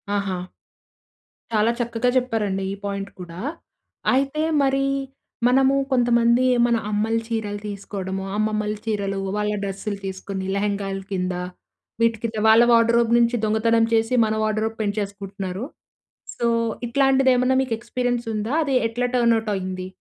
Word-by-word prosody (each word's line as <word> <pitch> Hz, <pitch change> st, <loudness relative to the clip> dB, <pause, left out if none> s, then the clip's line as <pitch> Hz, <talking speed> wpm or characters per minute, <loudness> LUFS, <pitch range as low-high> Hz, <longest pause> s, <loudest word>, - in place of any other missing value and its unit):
ఆహా! 195 Hz, -3 st, -2 dB, 1.1 s
చాలా 220 Hz, +1 st, +3 dB
చక్కగా 235 Hz, +1 st, 0 dB
చెప్పారండి, 210 Hz, -6 st, 0 dB
ఈ -, -, -4 dB
పాయింట్ 200 Hz, 0 st, -3 dB
కూడా. 175 Hz, -1 st, -8 dB, 0.7 s
అయితే 275 Hz, +3 st, +1 dB, 0.2 s
మరి 275 Hz, 0 st, +2 dB, 0.6 s
మనము 265 Hz, +2 st, +4 dB, 0.2 s
కొంతమంది, 240 Hz, 0 st, +3 dB, 0.2 s
మన 235 Hz, -, +2 dB, 0.2 s
అమ్మలు 220 Hz, +2 st, +1 dB
చీరలు 210 Hz, -3 st, -3 dB
తీసుకోవడము, 195 Hz, -1 st, -5 dB
అమ్మమ్మల 215 Hz, 0 st, 0 dB
చీరలు 200 Hz, -3 st, -1 dB, 0.2 s
వాళ్ళ 210 Hz, 0 st, 0 dB
డ్రెస్సులు 200 Hz, +1 st, -4 dB
తీసుకొని 190 Hz, 0 st, -5 dB
లెహంగాల 200 Hz, -1 st, -1 dB
కింద, 185 Hz, -1 st, -1 dB, 0.7 s
వీటి 230 Hz, -1 st, +3 dB
కింద, 225 Hz, -1 st, -3 dB
వాళ్ళ 225 Hz, +2 st, +7 dB
వార్డ్‌రోబ్ 230 Hz, 0 st, +4 dB
నుంచి 235 Hz, +1 st, +3 dB
దొంగతనం 225 Hz, +1 st, +3 dB
చేసి, 225 Hz, +2 st, +2 dB
మన 215 Hz, -, 0 dB
వార్డ్‌రోబ్ 215 Hz, +1 st, -1 dB
పెంచేసుకుంటున్నారు. 200 Hz, -1 st, -4 dB, 0.7 s
సో, 235 Hz, -, -1 dB, 0.4 s
ఇట్లాంటిది 270 Hz, +1 st, +3 dB
ఏమన్నా 255 Hz, +1 st, +2 dB
మీకు 245 Hz, -4 st, -2 dB
ఎక్స్పీరియన్స్ 245 Hz, 0 st, -2 dB
ఉందా? 215 Hz, +4 st, -2 dB
అది 275 Hz, -2 st, -1 dB
ఎట్లా 245 Hz, +2 st, -1 dB
టర్న్‌అవుట్ 230 Hz, -2 st, +2 dB
అయింది? 185 Hz, -1 st, -4 dB
220 Hz, 125 wpm, -23 LUFS, 200-235 Hz, 1.1 s, వాళ్ళ